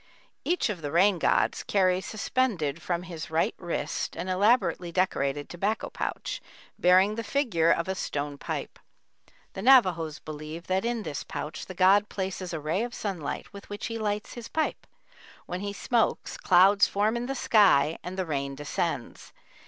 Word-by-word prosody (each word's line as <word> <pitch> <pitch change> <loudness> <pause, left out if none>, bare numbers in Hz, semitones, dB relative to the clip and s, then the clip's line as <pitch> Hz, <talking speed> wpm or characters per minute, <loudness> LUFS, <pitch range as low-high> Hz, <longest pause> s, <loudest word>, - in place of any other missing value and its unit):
Each 355 +2 +1
of 190 -5 -4
the 145 - -3
rain 185 +2 +4
gods - - +2
carries 185 -1 +1
suspended 200 - -1
from 175 +1 -2
his 170 -3 -7
right 160 +1 +1
wrist 175 -2 -3
an 185 - -4
elaborately 185 -2 +2
decorated 145 -6 0
tobacco 200 +5 -2
pouch, - - -4 0.4
bearing 185 +3 +5
the 230 +1 -4
figure 210 - +1
of 165 +1 +2
a 190 - 0
stone 145 -5 -4
pipe. - - -5 0.7
The 190 - -6
Navajos 185 - +4
believe 155 +2 -8
that 190 +3 0
in 235 -2 -1
this 150 -5 -4
pouch 150 - -6
the 185 - -8
god 195 +3 +4
places 190 -2 -4
a 165 - -3
ray 155 +7 -1
of 240 0 -4
sunlight 185 -8 -4
with 200 0 -11
which 205 0 -5
he 225 - -4
lights 210 -1 -2
his 240 -2 -8
pipe; 315 -1 -2 0.6
when 180 - -4
he 200 +1 -3
smokes, 225 +3 0
clouds 195 +2 +5
form 210 +3 +1
in 240 +1 -2
the 270 - -2
sky 190 - +4
and 180 +1 -7
the 185 - -1
rain 140 -3 -3
descends. 145 -1 -4
185 Hz, 170 wpm, -27 LUFS, 165-210 Hz, 0.7 s, bearing